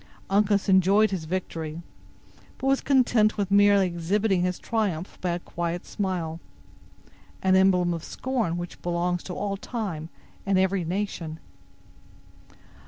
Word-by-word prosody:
Uncas 200 0 +2
enjoyed 195 +3 +4
his 180 -5 -3
victory, 165 -2 -4 0.7
but 265 - -6
was 270 0 +3
content 240 -6 +3
with 200 -1 -1
merely 200 -1 +5
exhibiting 185 +3 0
his 180 0 0
triumph 200 -7 -2
by 180 - -1
a 170 - 0
quiet 175 0 -4
smile—an 175 -5 -3 1.2
emblem 180 -2 +4
of 165 -1 -5
scorn 235 -10 -2
which 175 0 -7
belongs 175 0 -1
to 180 - -7
all 200 -1 -2
time 190 -9 -5 0.3
and 195 -1 +1
every 190 0 +2
nation. 170 -3 -3
185 Hz, 125 wpm, -26 LUFS, 175-205 Hz, 1.2 s, merely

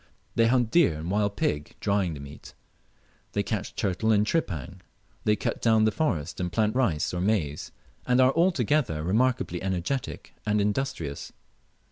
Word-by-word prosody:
They 115 0 +3
hunt 120 -2 +2
deer 170 - +4
and 85 +3 -4
wild 100 0 +1
pig, 75 -7 -1
drying 100 -5 0
the - - -8
meat; 70 +1 -11 0.8
they - - +1
catch - - -3
turtle 100 +4 0
and 105 -1 +4
tripang; 95 - -2 0.4
they 105 - +4
cut - - -3
down 110 -2 +4
the 110 - +3
forest 90 - -1
and 90 -1 -2
plant 110 +2 +1
rice 100 -15 +1
or 90 - -2
maize, 90 -8 -1 0.4
and 125 0 +3
are 130 +1 +5
altogether 145 - +1
remarkably 105 -2 +1
energetic 95 +7 -3
and 105 0 +1
industrious. 105 - -2
105 Hz, 155 wpm, -27 LUFS, 85-125 Hz, 0.8 s, are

